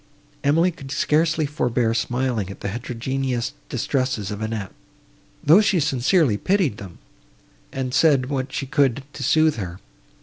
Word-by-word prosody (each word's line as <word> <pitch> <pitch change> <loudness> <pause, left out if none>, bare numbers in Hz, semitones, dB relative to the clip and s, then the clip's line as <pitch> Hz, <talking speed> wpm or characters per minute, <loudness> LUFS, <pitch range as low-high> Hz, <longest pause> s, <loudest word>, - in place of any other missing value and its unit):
Emily 165 +6 +3
could 135 -5 -11
scarcely 155 +2 +1
forbear 125 -5 0
smiling 120 -4 -1
at 100 - -10
the 100 - -3
heterogeneous 125 +2 -3 0.2
distresses 130 -7 -1
of 105 +1 -5
Annette, 110 -3 -4 0.7
though 165 +8 +7
she 195 -4 +2
sincerely 140 - +2
pitied 180 - +1
them, 95 -4 -10 0.7
and 130 -1 -3
said 140 -5 +4
what 130 -1 -3
she 135 - -3
could 135 -1 +1
to - - -8
sooth 155 +2 +3
her. 90 -3 -5
130 Hz, 140 wpm, -22 LUFS, 115-150 Hz, 0.7 s, though